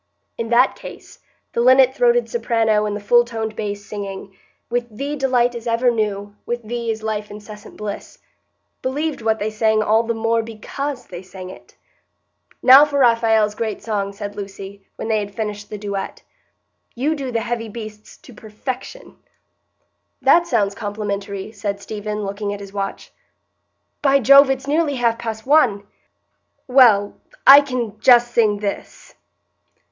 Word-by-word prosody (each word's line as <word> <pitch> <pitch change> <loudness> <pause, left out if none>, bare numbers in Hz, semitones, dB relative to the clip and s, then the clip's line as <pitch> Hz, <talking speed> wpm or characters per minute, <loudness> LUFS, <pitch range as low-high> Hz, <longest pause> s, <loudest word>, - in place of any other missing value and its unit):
In 230 -1 -5
that 245 +2 +3
case, - - -12 0.3
the 235 - 0
linnet 260 +1 +5
throated 485 -1 +2
soprano 225 - +1
and 205 - -3
the - - -4
full 240 +4 +4
toned 225 -2 -5
bass 205 -1 -5
singing,— 195 -2 -7 0.3
"With 240 0 -2
thee 275 +7 -5
delight 250 -3 +1
is 235 0 -7
ever 235 +2 +2
new, 205 -2 -3
With 240 0 -4
thee 235 +1 -4
is 220 -1 -3
life 215 -1 -3
incessant 210 0 -11
bliss," 210 -1 -7 0.6
believed 290 +2 -3
what 220 0 +1
they 215 +1 -3
sang 215 0 +1
all 220 +1 +3
the 230 0 -3
more 225 +1 +1
because 245 +4 -6
they 175 -1 -9
sang 185 0 -10
it. - - -16 0.9
"Now 265 +3 +9
for 290 -1 -1
Raphael's 225 -4 +3
great 220 -1 -4
song," 200 -3 -2
said 205 0 -7
Lucy, 200 0 -9
when - - -6
they 220 -1 +1
had 205 -1 -6
finished 210 -2 -5
the 210 - -6
duet. 200 -1 -5 0.7
"You 280 +6 0
do 275 -4 -5
the 230 -1 -1
'heavy 230 -1 -4
beasts' 215 -1 -10
to 250 - -14
perfection." 250 - -8 1.0
"That 345 0 +4
sounds 200 -10 +1
complimentary," 200 -1 -5
said 200 -2 -4
Stephen, 210 0 -5
looking 200 +1 -4
at - - -10
his 200 -1 -11
watch. 195 -1 -5 0.9
"By 275 -1 +4
Jove, 275 +2 +7
it's 270 0 -2
nearly 295 0 0
half 235 -2 0
past 220 -1 -5
one! 255 -9 +3 0.8
Well, 235 -6 +4 0.3
I 280 +1 +10
can 245 -6 -4
just 240 +1 +5
sing 215 -3 +3
this." 200 -1 -6
220 Hz, 155 wpm, -20 LUFS, 205-245 Hz, 1.0 s, I